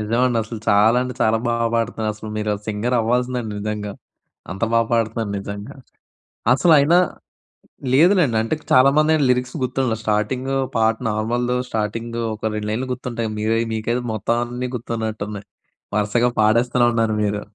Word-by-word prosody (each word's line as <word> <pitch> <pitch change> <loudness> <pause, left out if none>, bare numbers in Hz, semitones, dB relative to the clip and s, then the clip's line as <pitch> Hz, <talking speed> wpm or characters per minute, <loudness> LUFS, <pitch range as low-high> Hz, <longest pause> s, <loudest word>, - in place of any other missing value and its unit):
నిజమండి 115 +3 +1
అసలు 110 0 -7
చాలా 105 +4 +5
అంటే 125 -1 -5
చాలా 110 +1 +3
బాగా 115 0 +1
పాడుతున్నారసలు. 110 -2 -2
మీరు 105 0 -1
సింగరవ్వాల్సిందండి 120 +1 0
నిజంగా. 105 -1 -4 0.6
అంత 95 +5 -4
బాగా 115 -1 +3
పాడుతున్నారు 115 -2 0
నిజంగా. 100 +6 -7 0.8
అసలయినా 160 +3 +5 0.9
లేదులెండి. 160 - +4
అంటే 115 +7 -1 0.2
చాలామందేంటి 150 +3 +4
లిరిక్స్ 125 0 0
గుర్తుండవు. 125 -3 -1
స్టార్టింగో 125 +6 0 0.2
పాట 110 0 +3
నార్మల్‌దో 120 +3 -1
స్టార్టింగో 115 +2 -3
ఒక 110 - -18
2 105 0 -3
లైన్లు 125 +4 -2
గుర్తుంటాయి. 120 -3 -4
మీరై 110 +1 +1
మీకైతే 115 +3 -1
మొత్తం 110 +2 0
అన్నీ 125 +1 -4
గుర్తున్నట్టున్నాయి. 110 -3 -4 0.5
వరుసగా 110 +4 +2
పాడేస్తూనే 120 +3 +3
ఉన్నారు 115 -1 +1
మీరు. 105 0 -1
115 Hz, 125 wpm, -21 LUFS, 110-125 Hz, 0.9 s, చాలా